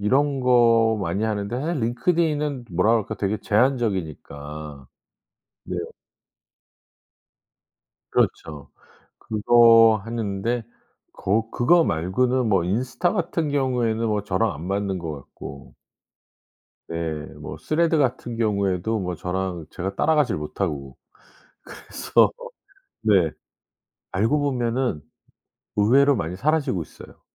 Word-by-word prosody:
이런 135 Hz, +6 st, +1 dB
거 115 Hz, -3 st, +4 dB
많이 95 Hz, +5 st, -1 dB
하는데 110 Hz, +3 st, -2 dB
사실 160 Hz, -1 st, -2 dB
링크드인은 150 Hz, +2 st, 0 dB
뭐라 90 Hz, +6 st, +2 dB
그럴까 110 Hz, -3 st, 0 dB
되게 100 Hz, +1 st, -1 dB
제한적이니까. 80 Hz, -, -2 dB, 0.8 s
네. -, -, -5 dB, 2.3 s
그렇죠. 75 Hz, -2 st, -1 dB, 0.5 s
그거 115 Hz, 0 st, +5 dB
하는데 115 Hz, +1 st, -2 dB, 0.5 s
거 110 Hz, +4 st, -1 dB
그거 165 Hz, +8 st, +4 dB
말고는 125 Hz, -, 0 dB
뭐 95 Hz, -4 st, +3 dB
인스타 125 Hz, -, -1 dB
같은 165 Hz, -5 st, -1 dB
경우에는 125 Hz, -5 st, 0 dB
뭐 105 Hz, -1 st, 0 dB
저랑 105 Hz, +1 st, 0 dB
안 80 Hz, +3 st, -8 dB
맞는 100 Hz, -1 st, -1 dB
것 80 Hz, -2 st, -5 dB
같고. 70 Hz, -3 st, -11 dB, 1.2 s
네. 85 Hz, -2 st, -3 dB, 0.2 s
뭐 -, -, -8 dB
스레드 165 Hz, +1 st, +1 dB
같은 125 Hz, -4 st, -1 dB
경우에도 100 Hz, -1 st, 0 dB
뭐 90 Hz, -1 st, -3 dB
저랑 90 Hz, -1 st, -3 dB
제가 95 Hz, +2 st, -4 dB
따라가질 150 Hz, -, +2 dB
못하고. 75 Hz, -4 st, -4 dB, 0.7 s
그래서 -, -, +1 dB, 0.7 s
네. 95 Hz, -7 st, +3 dB, 0.8 s
알고 115 Hz, +10 st, +1 dB
보면은 125 Hz, -, -1 dB, 0.8 s
의외로 135 Hz, +7 st, +4 dB
많이 85 Hz, 0 st, -3 dB
사라지고 145 Hz, -, 0 dB
있어요. -, -, -14 dB
110 Hz, 235 characters per minute, -23 LUFS, 95-125 Hz, 2.3 s, 그거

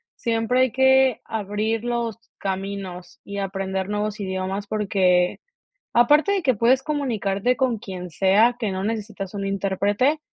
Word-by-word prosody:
siempre 230 Hz, +2 st, +1 dB
hay 260 Hz, -, +3 dB
que 265 Hz, -1 st, +4 dB
abrir 215 Hz, +1 st, -2 dB
los 235 Hz, -2 st, -2 dB, 0.2 s
caminos 190 Hz, -2 st, -5 dB
y 200 Hz, 0 st, -6 dB
aprender 190 Hz, 0 st, -3 dB
nuevos 210 Hz, 0 st, -2 dB
idiomas, 190 Hz, +1 st, -3 dB
porque 190 Hz, -4 st, +1 dB, 0.5 s
aparte 295 Hz, +10 st, +5 dB
de 395 Hz, -2 st, 0 dB
que 270 Hz, -5 st, +3 dB
puedes 240 Hz, +5 st, +3 dB
comunicarte 245 Hz, -6 st, -1 dB
con 255 Hz, -4 st, +1 dB
quien 185 Hz, -5 st, -7 dB
sea 205 Hz, +8 st, +3 dB
que 220 Hz, -4 st, -1 dB
no 190 Hz, +1 st, -3 dB
necesitas 210 Hz, -3 st, -4 dB
un 200 Hz, -1 st, -4 dB
intérprete, 200 Hz, +8 st, +1 dB
210 Hz, 140 wpm, -23 LUFS, 195-240 Hz, 0.5 s, aparte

